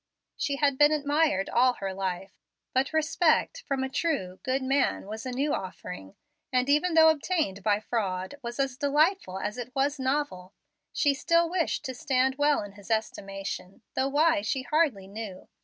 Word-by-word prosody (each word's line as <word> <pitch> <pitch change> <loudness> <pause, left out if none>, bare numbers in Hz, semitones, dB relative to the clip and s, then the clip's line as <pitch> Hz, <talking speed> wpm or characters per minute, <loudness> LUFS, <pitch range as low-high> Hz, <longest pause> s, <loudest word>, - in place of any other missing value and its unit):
She 280 - -1
had 280 -2 +1
been 295 0 +7
admired 290 -8 +1
all 250 +1 +3
her 195 -4 -4
life, 190 0 -3 0.4
but 260 +1 +1
respect 315 +8 +2
from 270 -1 0
a - - -1
true, 265 - -2
good 260 0 -1
man 270 -4 +1
was 220 +4 -6
a - - -3
new 275 +4 0
offering, 180 - -6 0.4
and, 255 0 +2
even 300 +4 +2
though 320 0 +8
obtained 310 - 0
by 205 +1 +2
fraud, 190 -5 -2
was 240 +1 -6
as 270 -2 0
delightful 295 - +1
as 210 +5 -4
it 245 +1 -6
was 280 +2 +1
novel. 260 -9 -2 0.4
She 285 -2 +2
still 335 +4 +2
wished 340 -4 -1
to 260 - -3
stand 260 0 +1
well 290 -4 +3
in 205 - -8
his 200 +1 -15
estimation, 195 -3 -4
though 265 - +1
why 310 +2 +3
she 265 -3 -2
hardly 270 -8 +1
knew. 200 -2 -8
265 Hz, 175 wpm, -28 LUFS, 205-295 Hz, 0.4 s, though